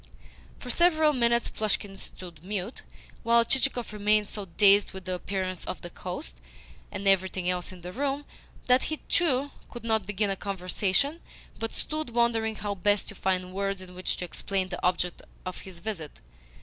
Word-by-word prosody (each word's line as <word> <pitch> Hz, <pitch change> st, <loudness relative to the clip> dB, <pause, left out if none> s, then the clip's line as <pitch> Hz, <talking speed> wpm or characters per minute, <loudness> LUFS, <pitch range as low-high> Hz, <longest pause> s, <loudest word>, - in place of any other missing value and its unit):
For 250 Hz, -, -4 dB
several 315 Hz, -1 st, +5 dB
minutes 235 Hz, -2 st, +3 dB
Plushkin 205 Hz, -2 st, 0 dB
stood 175 Hz, -4 st, -10 dB
mute, 200 Hz, +3 st, -3 dB, 0.4 s
while 235 Hz, 0 st, +5 dB
Chichikov 255 Hz, -3 st, 0 dB
remained 210 Hz, 0 st, +3 dB
so 205 Hz, -1 st, -6 dB
dazed 200 Hz, +3 st, +5 dB
with 190 Hz, -1 st, -7 dB
the 185 Hz, -, -2 dB
appearance 185 Hz, 0 st, -2 dB
of -, -, -4 dB
the -, -, -8 dB
host -, -, -6 dB, 0.5 s
and 200 Hz, -, -3 dB
everything 190 Hz, -1 st, +3 dB
else 180 Hz, 0 st, -1 dB
in 185 Hz, -1 st, -11 dB
the 180 Hz, +1 st, -7 dB
room, 280 Hz, +3 st, -1 dB, 0.4 s
that 250 Hz, +1 st, +5 dB
he 310 Hz, -, -1 dB
too, 285 Hz, -5 st, +1 dB, 0.2 s
could 240 Hz, -, -8 dB
not 220 Hz, -4 st, +1 dB
begin 210 Hz, 0 st, +1 dB
a -, -, 0 dB
conversation, 195 Hz, -, 0 dB, 0.4 s
but 225 Hz, 0 st, -3 dB
stood 310 Hz, -6 st, -2 dB
wondering 225 Hz, -2 st, +2 dB
how 205 Hz, -1 st, -2 dB
best 205 Hz, +1 st, +2 dB
to -, -, -4 dB
find 185 Hz, -1 st, -1 dB
words 195 Hz, 0 st, -1 dB
in 185 Hz, -1 st, -9 dB
which 185 Hz, +1 st, -1 dB
to 180 Hz, -, -3 dB
explain 185 Hz, +2 st, -2 dB
the -, -, -5 dB
object 180 Hz, -1 st, +1 dB, 0.2 s
of 185 Hz, -, -4 dB
his 190 Hz, -2 st, -9 dB
visit. 170 Hz, -, -5 dB
200 Hz, 175 wpm, -28 LUFS, 185-235 Hz, 0.5 s, several